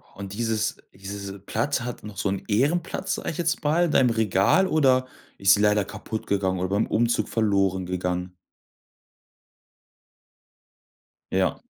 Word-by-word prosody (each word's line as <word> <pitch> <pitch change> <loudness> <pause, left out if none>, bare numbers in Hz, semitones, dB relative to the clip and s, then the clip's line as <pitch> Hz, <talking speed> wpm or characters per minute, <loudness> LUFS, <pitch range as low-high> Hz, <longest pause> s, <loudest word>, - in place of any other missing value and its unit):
Und 100 0 -7
dieses 110 0 -1 0.2
diese 100 0 -7
Platte 130 +6 -2
hat 125 - -6
noch 105 -1 -9
so 100 - 0
'n 95 0 -3
Ehrenplatz, 145 - 0
sage - - -4
ich 160 - -8
jetzt 165 -1 -1
mal, 160 +4 +3
in 165 - -1
deinem 130 -4 +4
Regal 110 - +3
oder 130 -6 +3 0.3
ist 95 0 +5
sie 105 - +2
leider 105 -1 +3
kaputtgegangen 100 -3 -2
oder 90 0 -1
beim 100 +2 +1
Umzug 115 +1 +1
verloren 100 -4 +1
gegangen? 90 0 -3 3.0
Ja. - - +1
105 Hz, 140 wpm, -25 LUFS, 95-125 Hz, 3.0 s, ist